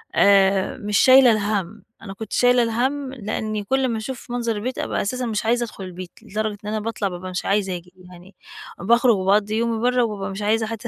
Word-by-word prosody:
آآ، 195 Hz, -1 st, +4 dB
مش 205 Hz, -1 st, -1 dB
شايلة 260 Hz, -2 st, +7 dB
الهَم. 205 Hz, -1 st, -2 dB, 0.2 s
أنا 195 Hz, -3 st, -8 dB
كنت 210 Hz, +1 st, -8 dB
شايلة 245 Hz, 0 st, +4 dB
الهَم 260 Hz, +4 st, -1 dB
لإني 215 Hz, -2 st, -4 dB
كُلّ 265 Hz, +6 st, 0 dB
أمّا 235 Hz, -3 st, -1 dB
أشوف 240 Hz, +2 st, -7 dB
منظر 235 Hz, -2 st, -1 dB
البيت 245 Hz, +5 st, -4 dB
أبقى -, -, -2 dB
أساسًا 250 Hz, +5 st, -2 dB
مش 220 Hz, -1 st, -2 dB
عايزة 240 Hz, +1 st, +2 dB
أدخُل 215 Hz, -4 st, -8 dB
البيت، 185 Hz, -1 st, -8 dB
لدرجة 215 Hz, 0 st, -3 dB
إن -, -, -3 dB
أنا 215 Hz, 0 st, -1 dB
باطلَع 215 Hz, -2 st, -3 dB
بابقى 185 Hz, 0 st, -6 dB
مش 180 Hz, -, -4 dB
عايزة 195 Hz, -2 st, 0 dB
آجي 180 Hz, +1 st, -16 dB
يعني، 180 Hz, +1 st, -15 dB, 0.4 s
باخرُج 235 Hz, +4 st, +4 dB
وباقضّي 200 Hz, +3 st, +1 dB
يومي 230 Hz, -1 st, 0 dB
برّا 250 Hz, 0 st, +2 dB
وبابقى 205 Hz, -3 st, -3 dB
مش 195 Hz, -, -6 dB
عايزة 220 Hz, +1 st, +1 dB
حتى 225 Hz, +1 st, -6 dB
215 Hz, 205 wpm, -22 LUFS, 195-235 Hz, 0.4 s, شايلة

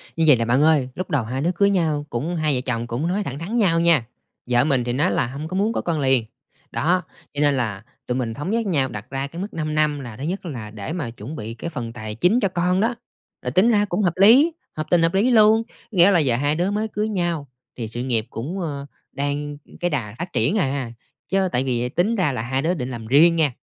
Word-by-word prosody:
Như 165 Hz, -, +1 dB
vầy 150 Hz, -, +8 dB
nè 115 Hz, -, 0 dB
bạn 125 Hz, +4 st, +2 dB
ơi, 150 Hz, -5 st, +3 dB
lúc 185 Hz, -, -4 dB
đầu 140 Hz, -5 st, +1 dB
hai 125 Hz, +4 st, -3 dB
đứa 170 Hz, +4 st, +1 dB
cưới 200 Hz, +2 st, +4 dB
nhau, 160 Hz, -6 st, 0 dB
cũng 150 Hz, +9 st, -2 dB
hai 155 Hz, -3 st, +1 dB
vợ 125 Hz, -, -1 dB
chồng 120 Hz, -2 st, -2 dB
cũng 125 Hz, +8 st, -2 dB
nói 195 Hz, +4 st, 0 dB
thẳng 140 Hz, -4 st, -5 dB
thắn 200 Hz, +9 st, -3 dB
nhau 180 Hz, -7 st, +3 dB
nha. 165 Hz, -8 st, +4 dB, 0.4 s
Vợ 120 Hz, 0 st, +4 dB
mình 135 Hz, -5 st, +1 dB
thì 120 Hz, 0 st, -2 dB
nói 150 Hz, +7 st, +2 dB
là -, -, +1 dB
hông 140 Hz, +5 st, -6 dB
có 185 Hz, -, -5 dB
muốn 210 Hz, +3 st, +1 dB
có -, -, -1 dB
con 165 Hz, -3 st, -1 dB
liền. 130 Hz, -4 st, +2 dB, 0.5 s
Đó, 165 Hz, +10 st, +1 dB, 0.3 s
cho 145 Hz, -, -2 dB
nên 145 Hz, -2 st, +4 dB
là 105 Hz, -5 st, -2 dB, 0.2 s
tụi 125 Hz, +1 st, -1 dB
mình 115 Hz, -3 st, -2 dB
thống 145 Hz, +9 st, -5 dB
nhất 230 Hz, 0 st, 0 dB
nhau, 140 Hz, -8 st, +1 dB
đặt 105 Hz, -2 st, -8 dB
ra 135 Hz, +1 st, -3 dB
cái 170 Hz, +5 st, -7 dB
mức 200 Hz, -, -6 dB
5 155 Hz, -1 st, -3 dB
năm, 150 Hz, -1 st, +1 dB
là 120 Hz, -4 st, -8 dB
thứ 135 Hz, -, -7 dB
nhất 180 Hz, +4 st, -3 dB
là 115 Hz, -9 st, -6 dB
để 105 Hz, +9 st, -6 dB
mà 155 Hz, -10 st, -3 dB
chuẩn 120 Hz, +6 st, -8 dB
bị 110 Hz, -3 st, -6 dB
cái 170 Hz, -, -6 dB
phần 120 Hz, -7 st, -5 dB
tài 110 Hz, -2 st, -6 dB
chính 180 Hz, -, +3 dB
cho 200 Hz, -, +2 dB
con 180 Hz, +2 st, +1 dB
đó. 235 Hz, +2 st, +1 dB, 0.5 s
Rồi 125 Hz, -, -3 dB
tính 185 Hz, -, +4 dB
ra 205 Hz, -1 st, +3 dB
cũng 195 Hz, 0 st, -1 dB
hợp 175 Hz, -3 st, +2 dB
lý, 245 Hz, -, +7 dB, 0.3 s
hợp 155 Hz, -, -2 dB
tình 175 Hz, -2 st, +4 dB
hợp 165 Hz, -, +2 dB
lý 215 Hz, +7 st, +3 dB
luôn. 220 Hz, 0 st, +5 dB, 0.3 s
Nghĩa 190 Hz, -1 st, +6 dB
là 175 Hz, -, +4 dB
giờ 135 Hz, -6 st, +2 dB
hai 145 Hz, +4 st, +1 dB
đứa 180 Hz, +4 st, 0 dB
mới 215 Hz, +2 st, -1 dB
cưới 215 Hz, +1 st, -2 dB
nhau, 175 Hz, -7 st, -1 dB, 0.3 s
thì 115 Hz, -2 st, -4 dB
sự 120 Hz, +3 st, -4 dB
nghiệp 115 Hz, -4 st, -1 dB
cũng, 160 Hz, +12 st, -5 dB
ờ, 145 Hz, -5 st, -4 dB, 0.3 s
đang 145 Hz, +1 st, -3 dB, 0.2 s
cái 175 Hz, -, 0 dB
đà 115 Hz, -8 st, -3 dB
phát 175 Hz, +1 st, -5 dB
triển 210 Hz, -, +2 dB
à. 135 Hz, -, -1 dB, 0.4 s
Chớ 190 Hz, -1 st, +1 dB
tại 125 Hz, -, +1 dB
vì 125 Hz, -2 st, -1 dB
tính 195 Hz, -, +1 dB
ra 180 Hz, -8 st, +1 dB
là 125 Hz, -, -3 dB
hai 130 Hz, +3 st, -1 dB
đứa 170 Hz, +3 st, +1 dB
định 130 Hz, -7 st, -4 dB
làm 115 Hz, -3 st, -7 dB
riêng 160 Hz, +7 st, +6 dB
nha, 155 Hz, -5 st, +2 dB
150 Hz, 265 wpm, -22 LUFS, 125-180 Hz, 0.5 s, vầy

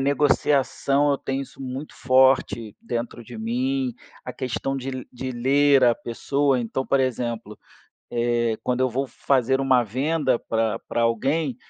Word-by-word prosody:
negociação, 140 Hz, 0 st, +2 dB
eu -, -, +1 dB
tenho 135 Hz, +1 st, -3 dB
isso 135 Hz, -, -11 dB
muito 130 Hz, +3 st, -6 dB
forte 130 Hz, -4 st, +2 dB
dentro 120 Hz, 0 st, -4 dB
de 120 Hz, -, -10 dB
mim, 255 Hz, +3 st, -1 dB, 0.3 s
a -, -, -5 dB
questão 135 Hz, +1 st, -3 dB
de 130 Hz, -1 st, -5 dB
de 130 Hz, +1 st, -5 dB
ler 135 Hz, +2 st, +4 dB
a 120 Hz, -1 st, +5 dB
pessoa, 135 Hz, +4 st, 0 dB
então, 120 Hz, +3 st, -3 dB
por 140 Hz, -, +2 dB
exemplo, 120 Hz, -4 st, -2 dB, 0.5 s
eh, 120 Hz, -1 st, 0 dB
quando 125 Hz, 0 st, -1 dB
eu 130 Hz, -, +3 dB
vou 135 Hz, +3 st, -2 dB
fazer 130 Hz, 0 st, +1 dB
uma 130 Hz, -2 st, +4 dB
venda 130 Hz, +3 st, 0 dB
pra 115 Hz, -1 st, -1 dB
pra 120 Hz, -, 0 dB
alguém. 135 Hz, +4 st, 0 dB
130 Hz, 150 wpm, -24 LUFS, 120-140 Hz, 0.5 s, a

